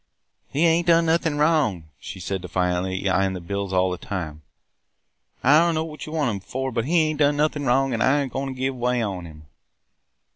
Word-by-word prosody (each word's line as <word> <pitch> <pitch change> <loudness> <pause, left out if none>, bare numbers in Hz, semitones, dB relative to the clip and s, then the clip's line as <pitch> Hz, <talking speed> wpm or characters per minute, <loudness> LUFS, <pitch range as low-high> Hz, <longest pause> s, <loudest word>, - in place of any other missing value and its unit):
"'He 150 +5 +1
ain't 170 +1 +2
done 165 0 +5
nothin' 160 -2 +1
wrong!' 150 - +2 0.2
she 95 - -8
said 95 +1 -3
defiantly, 90 +1 -1
yet 95 -1 +1
eyeing 95 0 +1
the 90 - -5
bills 100 +2 -4
all 95 0 +2
the 90 - -4
time. 80 -5 -5 1.0
'I 145 +4 +6
dunno 165 -1 +2
what 155 -1 -8
you - - -7
want 150 -6 0
him 100 - -4
for, 130 +7 -4
but 115 0 -1
he 165 +3 +3
ain't 155 -1 -4
done 145 0 +3
nothin' 150 -2 0
wrong 135 +1 +2
an' 115 - -2
I 140 +4 +3
ain't 135 - -7
goin' 135 +1 -2
to 135 - -4
give 130 +1 -2
way 125 -1 0
on 95 -4 -4
him!' 75 -1 -14
125 Hz, 215 wpm, -23 LUFS, 95-150 Hz, 1.0 s, I